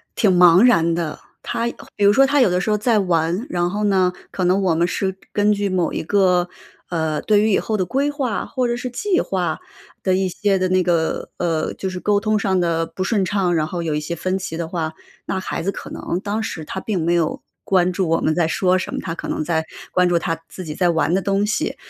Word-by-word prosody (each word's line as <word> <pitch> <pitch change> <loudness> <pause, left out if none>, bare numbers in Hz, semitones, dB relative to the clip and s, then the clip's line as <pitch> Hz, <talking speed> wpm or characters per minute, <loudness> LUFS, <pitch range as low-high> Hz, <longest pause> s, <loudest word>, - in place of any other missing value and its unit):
挺 195 -5 +3
茫 180 +2 +7
然 170 -9 +4
的。 165 -3 -3 0.2
他 - - -7 0.5
比 205 - +1
如 205 - +6
说 270 +5 +6
他 285 +1 +2
有 250 - +5
的 180 0 +1
时 215 - -2
候 210 - +2
在 220 0 +2
玩， 175 +3 0
然 175 0 0
后 205 +3 -2
呢， 190 -3 +2 0.2
可 185 - -2
能 185 +3 +3
我 180 -4 +2
们 170 +2 +2
是 190 0 -2 0.2
根 210 0 +3
据 205 -1 0
某 180 -3 0
一 - - -2
个， 180 -1 +2 0.4
呃， 160 -3 -1
对 210 -1 +3
于 215 +1 +2
以 - - +3
后 220 - -2
的 190 -3 0
规 275 +9 0
划 270 -7 -2
或 255 -3 -1
者 240 0 -1
是 250 - -4
计 365 - 0
划 185 -2 -1 0.4
的 185 - +2
一 190 0 0
些 200 +2 +1
的 185 0 0
那 185 0 +3
个， 170 -2 0
呃， 165 -3 -1
就 190 - -4
是 185 -1 -5
沟 205 +1 +2
通 215 -1 +1
上 190 -2 +1
的 165 -1 +1
不 185 - -5
顺 200 -1 +1
畅， 185 -1 0
然 155 -1 +1
后 170 +1 -4
有 160 -2 -1
一 150 - 0
些 160 +3 -4
分 185 +3 -1
歧 180 -4 -5
的 165 -1 -3
话， 160 -2 -3 0.3
那 190 - -2
孩 185 - -4
子 180 - -2
可 - - -8
能 175 - -3
当 210 +2 -2
时 175 -7 -5
他 190 - -5
并 190 -4 -2
没 170 +1 +1
有 170 -3 0 0.2
关 185 -2 +3
注 185 0 -1
我 165 +1 +1
们 155 - +2
在 165 0 +1
说 185 +2 +2
什 185 - -4
么， - - -2
他 165 - -3
可 - - -6
能 - - -2
在 160 -1 -1 0.3
关 180 0 +3
注 175 -1 +2
他 165 -1 -2
自 185 - -8
己 155 -3 -5
在 180 +3 +1
玩 165 0 +1
的 190 - +2
东 200 +1 +1
西。 220 +10 -1
185 Hz, 270 characters per minute, -21 LUFS, 170-205 Hz, 0.5 s, 茫